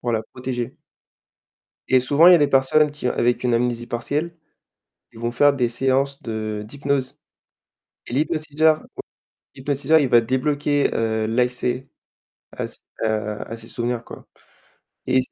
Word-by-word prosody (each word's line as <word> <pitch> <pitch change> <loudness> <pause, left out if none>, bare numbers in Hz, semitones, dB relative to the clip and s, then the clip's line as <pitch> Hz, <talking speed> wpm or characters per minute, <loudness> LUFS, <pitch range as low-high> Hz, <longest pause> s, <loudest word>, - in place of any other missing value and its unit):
pour 120 -1 -2
la 110 - 0
protéger. 125 -1 -5 1.1
Et 130 - +5
souvent, 145 +6 +5
il - - +10
y 180 - +9
a - - +5
des 145 - +3
personnes 140 +3 +3
qui 145 -3 -4
avec 120 0 +1
une 125 -1 +1
amnésie 120 0 0
partielle, 150 +9 -3 0.8
ils - - -14
vont 120 0 -1
faire 145 +4 +4
des 125 -3 +1
séances 135 +3 0
de 110 -2 -4
d'hypnose. 140 +1 -2 0.9
Et - - -7
l'hypnotiseur 155 +1 +1 0.7
l'hypnotiseur 145 +3 +2
il 145 -4 +1
va 120 -1 +6
débloquer 145 +4 0
heu, 110 -1 0
l'accès 125 +2 -1 0.7
à - - -3
s - - -9 0.3
à 105 -1 -1
à 115 - -8
ses 115 0 -12
souvenirs 120 0 -3
quoi - - -12 0.8
et 130 0 +3
c'est 125 - -6
130 Hz, 155 wpm, -22 LUFS, 120-145 Hz, 1.1 s, il